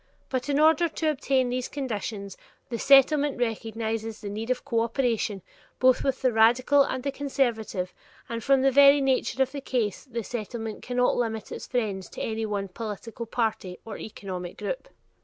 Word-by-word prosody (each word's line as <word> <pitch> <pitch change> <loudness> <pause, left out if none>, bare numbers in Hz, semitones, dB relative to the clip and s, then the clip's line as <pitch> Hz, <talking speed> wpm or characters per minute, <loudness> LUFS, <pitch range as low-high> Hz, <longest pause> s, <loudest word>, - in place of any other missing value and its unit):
But 260 +1 -2
in 285 0 +2
order 320 +2 +5
to 315 0 0
obtain 265 -3 +1
these 250 0 -2
conditions, 210 -7 -4 0.3
the 235 -2 -3
Settlement 280 +1 +5
recognizes 225 -1 -3
the 205 - -6
need 220 +3 -5
of 255 - -1
cooperation, 230 -4 0 0.3
both 255 0 +4
with 270 -1 -1
the 255 -2 +3
radical 245 +6 +5
and 260 -2 0
the 280 - -1
conservative, 235 -9 -1 0.3
and 230 -1 -4
from 270 +1 +4
the 270 - +4
very 280 +1 +7
nature 265 -1 +2
of 265 - -5
the 280 - -5
case 235 -6 -2
the 235 -3 -4
Settlement 225 0 -5
cannot 250 0 +1
limit 220 -3 -2
its - - -6
friends 205 -7 -2
to - - -8
any 220 0 -2
one 200 -2 -3
political 225 +3 -6
party 215 -6 -2
or 225 - -6
economic 185 -4 -7
school. - - -1
235 Hz, 170 wpm, -26 LUFS, 220-265 Hz, 0.3 s, very